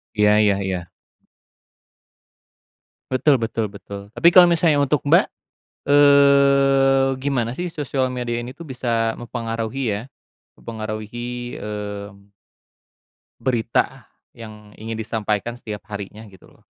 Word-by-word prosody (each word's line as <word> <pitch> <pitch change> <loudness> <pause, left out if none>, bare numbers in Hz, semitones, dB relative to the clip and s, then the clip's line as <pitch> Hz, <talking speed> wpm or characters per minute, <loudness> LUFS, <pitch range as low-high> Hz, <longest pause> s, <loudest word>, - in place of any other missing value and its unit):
Iya 105 0 +4
iya 100 -2 +3
iya. 90 -2 -4 2.2
Betul 130 0 +3
betul 115 -2 -2
betul, 100 +1 -10
tapi 170 - +4
kalo 180 +1 +8
misalnya 165 -4 +3
untuk 145 +1 0
Mbak, - - +4 0.5
eee, 140 -1 +5
gimana 130 -4 -1
sih 175 +7 -4
sosial 140 -5 -2
media 120 -2 -3
ini 125 +2 -8
tuh 170 - -10
bisa 120 -5 -1
mempengaruhi 115 +2 -4
ya, 100 - -2 0.6
mempengaruhi, 115 +3 -6
mmm 100 -1 -7 1.1
berita 120 +1 -1 0.2
yang 105 -3 -12
ingin 110 +1 -6
disampaikan 110 +1 -2
setiap 110 -4 -8
harinya 105 +2 -8
gitu 95 -2 -18
loh? - - -26
120 Hz, 110 wpm, -21 LUFS, 105-135 Hz, 2.2 s, kalo